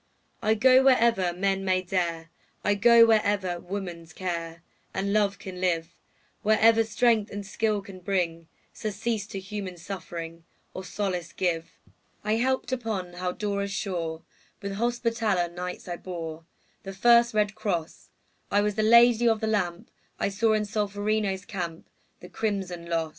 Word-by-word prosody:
I 220 Hz, 0 st, +3 dB
go 260 Hz, +4 st, +6 dB
wherever 230 Hz, -8 st, +4 dB
men 195 Hz, +2 st, 0 dB
may 185 Hz, -1 st, +1 dB
dare, 170 Hz, -3 st, -2 dB, 0.3 s
I 205 Hz, -, +3 dB
go 230 Hz, +3 st, +7 dB
wherever 205 Hz, -5 st, +2 dB
woman's 175 Hz, -3 st, -6 dB
care 170 Hz, -2 st, -4 dB, 0.3 s
And 200 Hz, +1 st, -1 dB
love 205 Hz, -2 st, +2 dB
can 185 Hz, -2 st, -8 dB
live, 170 Hz, -2 st, 0 dB, 0.5 s
Wherever 220 Hz, +1 st, +5 dB
strength 225 Hz, -1 st, +2 dB
and 205 Hz, 0 st, -6 dB
skill 210 Hz, 0 st, -1 dB
can 195 Hz, -2 st, -11 dB
bring 175 Hz, -3 st, -1 dB, 0.3 s
Surcease 215 Hz, 0 st, -3 dB
to 195 Hz, -, -5 dB
human 190 Hz, -2 st, -6 dB
suffering, 170 Hz, -2 st, -7 dB, 0.3 s
Or 185 Hz, -, -6 dB
solace 180 Hz, -2 st, -3 dB
give. 165 Hz, -3 st, -2 dB, 0.5 s
I 215 Hz, +1 st, +1 dB
helped 260 Hz, +1 st, 0 dB
upon 220 Hz, -8 st, -3 dB
Haldora's 200 Hz, +3 st, -2 dB
shore; 165 Hz, -5 st, -3 dB, 0.4 s
With 200 Hz, -, -5 dB
Hospitaller 230 Hz, -4 st, 0 dB
Knights 180 Hz, +2 st, -6 dB
I 175 Hz, -1 st, -4 dB
bore 165 Hz, -3 st, -7 dB, 0.4 s
The 195 Hz, -, -7 dB
first 235 Hz, +3 st, +5 dB
red 210 Hz, -1 st, +2 dB
cross; 195 Hz, -7 st, -4 dB, 0.4 s
I 205 Hz, -, +3 dB
was 210 Hz, 0 st, 0 dB
the 215 Hz, -, 0 dB
Lady 235 Hz, +1 st, +6 dB
of 225 Hz, -1 st, +2 dB
the 220 Hz, -, -2 dB
Lamp; 185 Hz, -6 st, -1 dB, 0.3 s
I -, -, +1 dB
saw 220 Hz, +3 st, +2 dB
in 215 Hz, -1 st, +1 dB
Solferino's 205 Hz, -2 st, -1 dB
camp 170 Hz, -4 st, -5 dB, 0.3 s
The -, -, -11 dB
crimson 190 Hz, -5 st, -3 dB
loss. 165 Hz, -1 st, -1 dB
200 Hz, 145 wpm, -27 LUFS, 175-215 Hz, 0.5 s, go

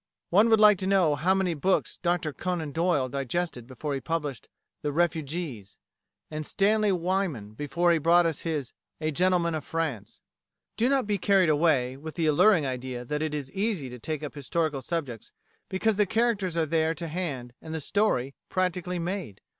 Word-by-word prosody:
One 210 Hz, +6 st, +5 dB
would 220 Hz, -1 st, +5 dB
like 210 Hz, -3 st, +7 dB
to 190 Hz, -, -2 dB
know 190 Hz, -6 st, +4 dB
how 175 Hz, +7 st, +2 dB
many 190 Hz, -3 st, +1 dB
books 185 Hz, +5 st, 0 dB
Dr 175 Hz, -4 st, 0 dB
Conan 175 Hz, -4 st, -3 dB
Doyle 165 Hz, -4 st, +1 dB
digested 135 Hz, 0 st, -3 dB
before 140 Hz, +3 st, -4 dB
he 135 Hz, -, -3 dB
published 145 Hz, -5 st, -3 dB, 0.3 s
"The 150 Hz, -, -1 dB
Refugees," 150 Hz, -, -2 dB, 0.5 s
and 155 Hz, 0 st, -3 dB
Stanley 210 Hz, +5 st, +2 dB
Weyman 175 Hz, -, -1 dB
before 150 Hz, +8 st, +1 dB
he 165 Hz, -, +3 dB
brought 170 Hz, +3 st, +5 dB
out 165 Hz, -3 st, 0 dB
his 150 Hz, -6 st, -3 dB, 0.3 s
"A 155 Hz, 0 st, -1 dB
Gentleman 175 Hz, +1 st, +2 dB
of 155 Hz, -2 st, -3 dB
France." 140 Hz, -12 st, -4 dB, 0.5 s
Do 235 Hz, +3 st, +2 dB
not 270 Hz, -3 st, +2 dB
be 205 Hz, -1 st, -1 dB
carried 195 Hz, -4 st, +4 dB
away 145 Hz, -5 st, +2 dB
with 155 Hz, +2 st, -8 dB
the 165 Hz, -, 0 dB
alluring 155 Hz, +2 st, +5 dB
idea 125 Hz, -1 st, -4 dB
that 150 Hz, +4 st, -2 dB
it 155 Hz, -1 st, -1 dB
is 140 Hz, -3 st, -5 dB
easy 195 Hz, -, -2 dB
to 125 Hz, -, -9 dB
take 155 Hz, +4 st, -4 dB
up 150 Hz, -, -5 dB
historical 150 Hz, 0 st, -1 dB
subjects 135 Hz, -9 st, -4 dB, 0.4 s
because 200 Hz, +2 st, +1 dB
the 210 Hz, -1 st, +3 dB
characters 205 Hz, -6 st, 0 dB
are 165 Hz, -, +2 dB
there 160 Hz, +1 st, +1 dB
to 165 Hz, +2 st, -5 dB
hand, 150 Hz, -8 st, -4 dB
and 160 Hz, -, -9 dB
the 160 Hz, -, -2 dB
"story" 145 Hz, -, 0 dB, 0.2 s
practically 180 Hz, -1 st, -1 dB
"made." 175 Hz, -, -4 dB
165 Hz, 180 wpm, -27 LUFS, 140-185 Hz, 0.5 s, like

